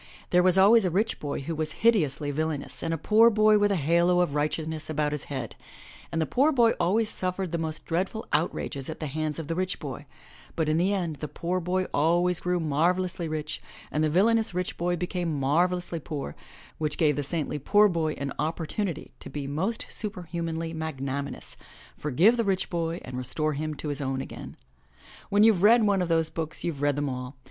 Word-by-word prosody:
There 180 - +5
was 185 0 +5
always 210 +4 +7
a 185 - +2
rich 210 +6 0
boy 145 -2 -3
who 165 +5 -4
was 155 0 -2
hideously 150 - +3
villainous 155 0 -3
and 165 - -2
a 165 - 0
poor 220 +8 +5
boy 215 -1 +4
with 205 0 +3
a - - +2
halo 170 +3 +3
of 175 -5 0
righteousness 155 +1 -2
about 150 -1 0
his 150 -2 -3
head, 130 -5 -5 0.6
and 165 - -1
the 160 - +2
poor 275 - +3
boy 235 -5 +4
always 200 +6 +2
suffered 185 -2 -3
the 170 - -1
most 160 -1 -4
dreadful 190 +6 -2
outrages 150 -3 -1
at 160 - -6
the 155 - -3
hands 155 +1 -2
of 160 -3 -5
the 165 - -1
rich 185 +2 -1
boy, - - -7 0.5
but 160 -2 0
in 155 +1 +2
the 180 +4 +2
end 175 -6 -2
the 150 - -5
poor 170 +5 -2
boy 180 +2 0
always 175 +4 +2
grew 180 0 0
marvelously 170 +3 0
rich 155 -1 -4 0.3
and 155 - 0
the 155 - +2
villainous 220 +4 +2
rich 180 0 -2
boy 175 +1 0
became 175 -3 -2
marvelously 175 +5 +1
poor, 145 - -5 0.4
which 150 -1 -1
gave 150 -4 +3
the 145 - -1
saintly 150 0 -2
poor 205 +9 +5
boy 165 -5 0
an 140 0 -4
opportunity 165 +2 -3
to - - -9
be 145 -1 -5
most 180 +12 -1
superhumanly 165 -5 -4
magnaminous, 140 -3 -5 0.4
forgive 165 - +3
the 230 - +2
rich 195 -3 -1
boy 170 0 -2
and 125 0 -5
restore 155 +4 -1
him 155 +1 -3
to 150 - -5
his 145 0 -2
own 135 -1 -2
again. - - -8 0.7
When 205 +1 +4
youVe 215 -5 +5
read 225 +3 +6
one 200 -2 +3
of 175 - -1
those 165 -1 +2
books 160 -1 -3
you've 155 -5 -3
read 145 -1 +2
them 145 0 -1
all. 125 0 -5
165 Hz, 205 wpm, -27 LUFS, 150-185 Hz, 0.7 s, always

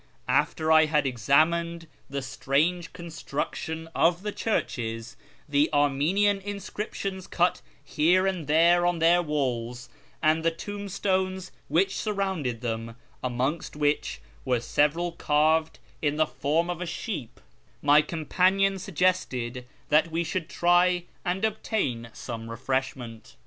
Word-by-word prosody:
After 160 0 +1
I 155 0 +7
had 150 -2 +1
examined 165 +7 +2 0.2
the 140 -1 -3
strange 155 +6 0
construction 160 -1 -5
of 170 +3 +2
the 210 - -2
churches, 115 - -2 0.3
the 145 +1 +2
Armenian 155 +8 +2
inscriptions 195 -1 -5
cut 175 +1 +1 0.2
here 175 +5 +3
and 185 -6 -2
there 170 +3 +5
on 175 -1 +1
their 170 +2 +4
walls, 125 -6 -2 0.3
and 155 +1 +2
the 165 - +4
tombstones 190 0 -2 0.2
which 190 +3 +2
surrounded 190 - -2
them 115 -1 -4 0.3
(amongst 130 +7 -2
which 145 - 0 0.2
were 125 - +1
several 150 +8 +1
carved 155 0 +2 0.2
in 145 -1 +1
the 155 +1 +3
form 160 +3 0
of 175 0 -5
a 180 - -3
sheep), 165 - -5 0.4
my 145 +1 +6
companion 185 +5 +1
suggested 135 -10 -1 0.2
that 155 +3 +4
we 165 +1 -1
should 170 -1 -3
try 175 0 +3 0.2
and 190 +3 0
obtain 195 - -2
some 115 -1 -7
refreshment. 125 -1 -4
160 Hz, 125 wpm, -27 LUFS, 140-180 Hz, 0.4 s, I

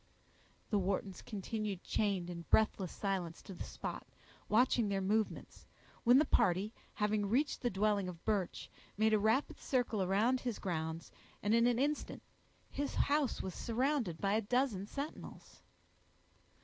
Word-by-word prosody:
The 205 - +3
Whartons 190 0 -2
continued 210 -1 -4
chained 195 -4 0
in 170 -1 -7
breathless 205 -4 +3
silence 185 -5 -2
to 195 - -8
the - - -6
spot, - - -6 0.4
watching 235 -1 +3
their 195 -1 0
movements, 210 +3 -1 0.4
when 245 +2 +7
the 300 - +5
party, 190 +4 +2 0.2
having 210 -1 +1
reached 275 +6 +1
the 245 - +1
dwelling 200 -2 +1
of 170 -2 -10
Birch, 205 -5 -1 0.3
made 220 +1 +3
a 215 - +5
rapid 220 +7 +1
circle 245 -5 0
around 210 +7 +2
his 245 -4 -3
grounds, 160 -2 -3 0.3
and 205 +2 +2
in 230 +1 +5
an 245 -1 +2
instant 290 +3 -1 0.5
his 285 0 -3
house 285 -2 +1
was 190 - -4
surrounded 240 - -1
by 200 0 +1
a 220 - +3
dozen 225 -3 0
sentinels. 280 +6 -7
210 Hz, 150 wpm, -35 LUFS, 190-245 Hz, 0.5 s, when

